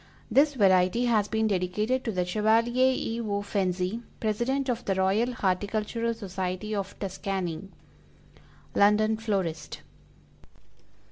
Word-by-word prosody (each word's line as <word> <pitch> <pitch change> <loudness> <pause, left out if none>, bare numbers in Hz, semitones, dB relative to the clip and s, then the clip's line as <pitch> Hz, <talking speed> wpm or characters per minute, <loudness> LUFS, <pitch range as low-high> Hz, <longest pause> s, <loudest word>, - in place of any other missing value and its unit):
This 290 +1 +4
variety 190 +1 +3
has 215 -4 +2
been 220 +1 0
dedicated 210 +6 0
to 225 - 0
the 180 -3 -1
Chevalier 230 +6 +3
E. 230 +1 -3
O. 205 -2 -2
FENZI, 190 +1 -1 0.2
President 240 +6 -1
of 245 -1 -1
the 195 - 0
Royal 195 +6 +2
Horticultural 215 +3 -1
Society 190 0 -4
of 200 -1 -4
Tuscany. 190 -2 -4 1.0
_London 215 +2 +3
Florist. 175 -8 -2
210 Hz, 115 wpm, -27 LUFS, 190-230 Hz, 1.0 s, This